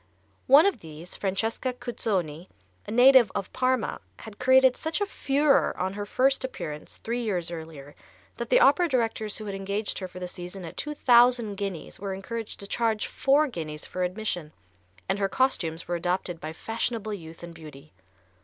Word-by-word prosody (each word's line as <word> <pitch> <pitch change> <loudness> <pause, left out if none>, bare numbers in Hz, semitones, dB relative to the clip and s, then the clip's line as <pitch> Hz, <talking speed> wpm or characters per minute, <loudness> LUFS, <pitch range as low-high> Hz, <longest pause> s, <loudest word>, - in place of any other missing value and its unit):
One 280 +6 +8
of 400 - +1
these, 160 +1 -10
Francesca 225 +6 -1
Cuzzoni, 195 -9 -3 0.4
a - - -5
native 245 -1 +7
of 195 - -4
Parma, 255 -2 0 0.2
had 215 -2 -11
created 260 0 +5
such 320 +3 -2
a 410 - +1
furore 285 -6 +2
on 185 +1 -2
her 205 0 -5
first 265 +5 +2
appearance, 155 -12 -6
three 235 +2 -3
years 180 -7 -2
earlier, 160 -4 -8 0.4
that - - -4
the - - +5
opera 355 -7 +5
directors 225 -5 0
who 215 - -6
had 200 - -4
engaged 200 +2 -3
her 185 - -4
for 180 - -13
the 180 - -4
season 180 +1 -7
at 165 - -9
two 300 0 -4
thousand 240 -4 +5
guineas 195 -4 -5
were 195 -1 -4
encouraged 225 +3 -5
to - - -6
charge 225 -1 0
four 280 +3 +3
guineas 155 - -6
for 185 - -5
admission, 180 -4 -2 0.5
and 195 +1 0
her 195 -1 +1
costumes 170 -12 0
were 175 - -1
adopted 175 -1 -2
by 155 - -5
fashionable 225 +3 -3
youth 165 -3 -9
and 170 0 -8
beauty. 150 -2 -13
205 Hz, 175 wpm, -27 LUFS, 175-250 Hz, 0.5 s, One